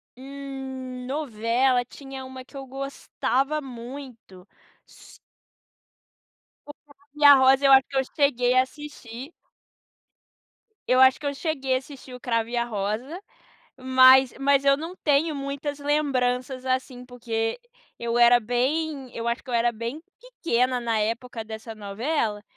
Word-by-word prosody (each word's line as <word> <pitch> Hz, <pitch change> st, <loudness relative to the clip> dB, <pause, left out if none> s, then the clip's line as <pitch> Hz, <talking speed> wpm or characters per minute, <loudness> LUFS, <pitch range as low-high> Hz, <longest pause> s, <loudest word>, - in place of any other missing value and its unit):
Hum... 265 Hz, -1 st, -8 dB
Novela, 250 Hz, -2 st, 0 dB
tinha 270 Hz, 0 st, -10 dB
uma 260 Hz, 0 st, -9 dB
que 280 Hz, -, -20 dB
eu 270 Hz, -1 st, -7 dB
gostava 275 Hz, +1 st, -2 dB
muito, 245 Hz, -7 st, -10 dB, 0.4 s
s -, -, -17 dB, 1.5 s
O 290 Hz, -, -8 dB
Cravo 285 Hz, 0 st, -24 dB
e 295 Hz, 0 st, +1 dB
a 285 Hz, -, +11 dB
Rosa 265 Hz, +1 st, +4 dB
eu 275 Hz, -, +6 dB
acho 265 Hz, -1 st, +6 dB
que 275 Hz, -, -4 dB
eu 265 Hz, -, +3 dB
cheguei 250 Hz, -4 st, +2 dB
a 255 Hz, -, +6 dB
assistir. 270 Hz, -2 st, -10 dB, 1.6 s
Eu 255 Hz, +1 st, +4 dB
acho 260 Hz, 0 st, +6 dB
que 300 Hz, -, -9 dB
eu 285 Hz, -, -1 dB
cheguei 270 Hz, -5 st, -1 dB
a -, -, +3 dB
assistir 265 Hz, -1 st, -13 dB
O 250 Hz, -, -9 dB
Cravo 230 Hz, -2 st, -1 dB
e 240 Hz, -, -4 dB
a 235 Hz, -, +1 dB
Rosa, 230 Hz, -, -4 dB, 0.6 s
mas 260 Hz, 0 st, +6 dB
mas 280 Hz, 0 st, +2 dB
eu 275 Hz, -, +5 dB
não 325 Hz, +5 st, -7 dB
tenho 300 Hz, +1 st, +2 dB
muitas 280 Hz, +1 st, -4 dB
lembranças 260 Hz, -3 st, -1 dB
assim, 255 Hz, -1 st, -2 dB
porque 230 Hz, -2 st, -3 dB, 0.4 s
eu 235 Hz, 0 st, -1 dB
era 240 Hz, 0 st, +7 dB
bem 265 Hz, +4 st, -2 dB
eu 230 Hz, -, -4 dB
acho 235 Hz, +1 st, -1 dB
que -, -, -22 dB
eu 245 Hz, -, -3 dB
era 235 Hz, 0 st, +2 dB
bem 235 Hz, +8 st, -6 dB, 0.2 s
pequena 260 Hz, -, -1 dB
na 230 Hz, -2 st, -1 dB
época 230 Hz, +2 st, -3 dB
dessa 220 Hz, +1 st, -8 dB
novela. 215 Hz, +1 st, -2 dB
260 Hz, 150 wpm, -25 LUFS, 240-280 Hz, 1.6 s, a